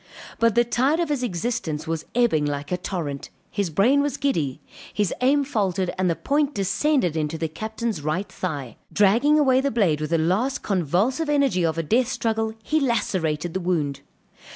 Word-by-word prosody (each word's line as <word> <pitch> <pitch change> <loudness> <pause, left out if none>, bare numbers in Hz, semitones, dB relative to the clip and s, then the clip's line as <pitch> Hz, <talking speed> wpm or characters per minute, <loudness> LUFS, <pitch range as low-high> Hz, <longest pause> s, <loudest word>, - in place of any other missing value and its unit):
But 230 -2 +3
the 240 - +5
tide 265 +7 +1
of 340 -3 0
his 290 -4 0
existence 175 -7 -2
was 160 -1 -3
ebbing 235 -11 +3
like 145 +1 -4
a 180 - +1
torrent, 165 -7 -4 0.2
his 200 -3 -1
brain 230 - +3
was 285 -1 -1
giddy, 160 - -1 0.3
his 205 -3 0
aim 280 +3 +3
faltered 195 -9 -1
and 185 -1 +1
the 165 - +1
point 285 - 0
descended 195 - +1
in 155 -1 0
the 160 +1 -3
Captain's 220 +3 -4
right 155 +7 -2
thigh; 145 -9 -5
dragging 230 +10 +4
away 265 -3 +4
the 280 - +1
blade 190 - +1
with 155 - -2
the 165 - +2
last 190 +12 0
convulsive 200 - 0
energy 275 -11 +2
of 165 -1 0
a 165 - 0
death 235 - +2
struggle, 225 -3 -1
he 310 +7 +1
lacerated 175 - -1
the 190 - -1
wound. 165 -6 -1
200 Hz, 180 wpm, -24 LUFS, 165-255 Hz, 0.3 s, the